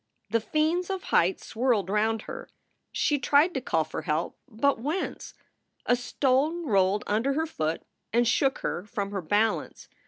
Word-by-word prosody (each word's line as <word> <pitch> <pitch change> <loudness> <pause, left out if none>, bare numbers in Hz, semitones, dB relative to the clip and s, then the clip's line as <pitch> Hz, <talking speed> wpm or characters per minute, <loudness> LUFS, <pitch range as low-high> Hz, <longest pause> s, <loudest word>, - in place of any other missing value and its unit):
The 230 - +3
fiends 320 - 0
of 385 -1 -3
height 180 +3 +2
swirled 230 -5 0
round 215 +2 +1
her. 485 0 -8 0.4
She 290 -1 +1
tried 295 +6 +4
to 265 - -2
call 165 -9 +1
for - - -6
help 155 +2 -2
but 270 +2 +1
whence? 300 +10 -4 0.5
A 245 - +4
stone 275 +7 0
rolled 200 -4 +2
under 225 +7 +1
her 315 +3 0
foot 160 - -3 0.3
and 235 +1 +3
shook 270 +3 +2
her 175 - -2
from 205 -2 -4
her 195 -2 -3
balance. 205 +7 0
240 Hz, 160 wpm, -27 LUFS, 205-295 Hz, 0.5 s, tried